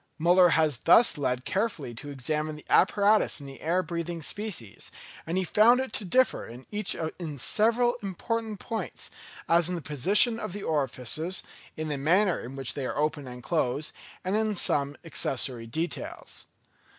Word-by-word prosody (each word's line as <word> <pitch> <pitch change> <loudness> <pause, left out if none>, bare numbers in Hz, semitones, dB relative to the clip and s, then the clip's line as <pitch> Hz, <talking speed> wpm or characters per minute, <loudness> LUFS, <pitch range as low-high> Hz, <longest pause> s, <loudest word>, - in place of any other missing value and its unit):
Müller 175 +1 +5
was 155 -6 +2
thus 230 -6 +6
led 125 -4 -2
carefully 190 - -2
to 130 +6 -9
examine 150 +3 -2
the 150 - -13
apparatus 205 +1 +4
in 140 - -10
the 135 -1 -10
air 175 +4 +1
breathing 170 0 -4
species; 185 - -4 0.4
and 170 +3 -1
he 190 - +1
found 220 +7 +5
it 260 -4 -3
to - - -1
differ 255 +8 +2
in 120 +3 -11
each 210 -1 -1 0.2
in 155 -5 -5
several 230 - +2
important 215 +2 -3
points, 225 -2 -5 0.4
as 170 0 +4
in 180 - -1
the - - -3
position 200 - +4
of 175 - -5
the 205 0 -6
orifices, 150 - -2 0.3
in 155 0 -3
the 145 -2 -2
manner 180 +6 +3
in 125 +3 -8
which 135 -2 0
they 135 -3 -3
are - - -4
opened 150 -3 -1
and 125 0 -10
closed, 150 -2 -1 0.3
and 185 +2 -1
in 215 -1 +1
some 140 -5 +1
accessory 130 -6 -1
details. 160 +9 -4
165 Hz, 170 wpm, -27 LUFS, 140-205 Hz, 0.4 s, thus